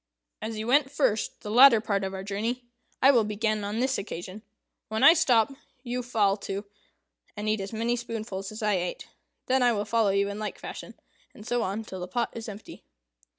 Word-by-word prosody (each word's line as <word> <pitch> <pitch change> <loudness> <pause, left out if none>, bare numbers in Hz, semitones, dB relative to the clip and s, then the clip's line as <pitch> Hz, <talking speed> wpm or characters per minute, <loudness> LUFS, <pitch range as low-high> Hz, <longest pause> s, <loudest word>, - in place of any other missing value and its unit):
As 220 0 -4
you 215 - -3
went 270 +3 +3
first 270 -7 0
the 210 - -6
latter 245 0 +8
part 200 -2 -1
of 190 - -2
our 190 0 -6
journey, 220 +5 -3 0.4
I 270 - +8
will 240 -5 +4
begin 215 0 -1
on 205 +2 -3
this 260 +1 +1
occasion. 190 +1 -7 0.5
When 220 0 -2
I 325 - +10
stop, 270 -7 +3 0.3
you 250 0 -3
fall 215 -5 +1
to, 200 0 -5 0.7
and 210 +1 -4
eat 215 -1 +1
as 195 - -6
many 230 +2 0
spoonfuls 220 -5 -5
as 215 +1 -7
I 210 -1 +2
ate. 180 0 -4 0.4
Then 260 0 +2
I 245 -1 +4
will 205 -1 -2
follow 220 -1 +2
you 200 +1 +2
in 200 +1 -5
like 215 - -4
fashion, - - -8 0.4
and 210 - -12
so 245 0 0
on 205 +2 -2
till 190 -3 -8
the 180 - -5
pot 235 +4 -1
is 225 -1 -6
empty." 210 0 -10
220 Hz, 205 wpm, -27 LUFS, 200-240 Hz, 0.7 s, I